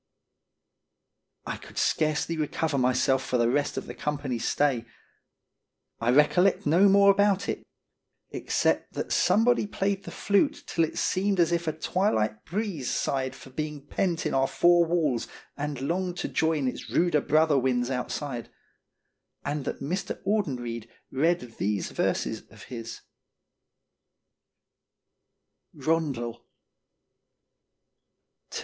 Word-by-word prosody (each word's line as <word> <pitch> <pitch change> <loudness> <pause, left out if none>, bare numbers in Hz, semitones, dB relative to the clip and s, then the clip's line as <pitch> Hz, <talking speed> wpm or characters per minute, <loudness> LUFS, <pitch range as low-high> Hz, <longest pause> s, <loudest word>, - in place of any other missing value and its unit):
I - - -4
could - - -14
scarcely 155 +1 +1
recover 155 -1 -1
myself 130 +1 +2
for 125 - 0
the 120 0 +2
rest 145 +2 0
of - - -3
the - - -7
company's 140 -5 -3
stay. 135 -5 +1 1.1
I 115 - 0
recollect 150 +8 +4
no 175 +7 +5
more 200 0 +7
about 200 -1 +2
it, - - -2 0.7
except - - 0
that - - -4
somebody 230 0 +3
played 195 -1 -1
the - - -6
flute 200 +8 +1
till 165 - +1
it - - -8
seemed 195 0 +1
as 170 -1 +4
if 170 -1 0
a - - +2
twilight 110 - 0
breeze 185 - -3
sighed 130 -1 -1
for 135 - -13
being 150 0 -5
pent 170 +2 -1
in 155 - -1
our 135 0 +3
four 175 +2 +4
walls 155 -8 0 0.3
and 145 -2 -4
longed 180 +4 -1
to - - -2
join 160 -4 +1
its 125 - -5
ruder 170 -4 +2
brother 155 -1 +3
winds 125 -1 0
outside; 125 -1 -4 1.0
and 145 0 -2
that'Mr. 180 +8 -3
Audenried 125 - -2 0.2
read 165 +6 +2 0.2
these 100 0 -1
verses - - -1
of - - -14
his: 115 -2 -7 2.8
Stoorn - - -12
Statement. 160 -3 +1
225 120 - -4
RONDEL. 120 0 -8
150 Hz, 130 wpm, -27 LUFS, 130-175 Hz, 2.8 s, more